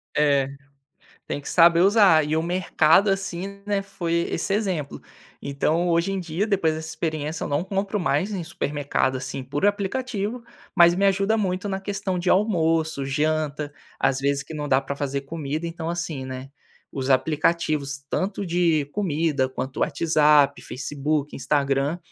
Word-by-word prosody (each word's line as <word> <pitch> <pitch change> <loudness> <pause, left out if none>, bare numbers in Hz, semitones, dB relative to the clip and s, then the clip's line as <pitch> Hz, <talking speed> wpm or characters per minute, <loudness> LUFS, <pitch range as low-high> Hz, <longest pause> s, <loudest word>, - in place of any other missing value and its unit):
É, 140 -3 +3 0.8
tem - - -3
que - - -9
saber 170 -1 +5
usar 190 -5 +5
e 155 +1 -1
o 160 - +1
mercado, 180 +2 +3
assim, 195 +1 -3
né, 205 -1 0
foi 175 -4 -4 0.2
esse 185 +3 -1
exemplo, 185 -9 -2 0.4
então 155 +5 0
hoje 170 +3 +1
em 190 - -2
dia 175 +5 -2
depois 185 -7 +1
dessa 160 0 -6
experiência 155 -1 -3
eu - - -2
não 145 +4 0
compro 195 +2 -2
mais 190 +2 0
em 185 - -3
supermercado, 145 -4 -1
assim, 130 +1 -5
por 145 +8 -1
aplicativo, 215 +2 -2 0.3
mas 170 0 +6
me 195 - +1
ajuda 195 +3 +2
muito 190 -1 -1
na 190 -1 -2
questão 195 -2 -3
de 180 - 0
almoço, 165 -7 +1
janta, 150 +1 -1 0.3
às 135 0 +1
vezes 140 0 0
que 160 - -9
não 150 -1 -4
dá 130 -1 +4
pra 140 +1 -5
fazer 140 -1 -3
comida 155 +2 -4
então, 165 -1 -4
assim, 170 -6 -4
né, 130 +1 -7 0.4
os 135 0 -3
aplicativos 150 0 +1
tanto 195 0 -2
de 170 -4 +2
comida 155 -8 0
quanto 130 0 -5
WhatsApp, 150 -1 +3
Facebook, 145 +2 -3
Instagram, 140 +3 0
160 Hz, 155 wpm, -24 LUFS, 145-190 Hz, 0.8 s, mas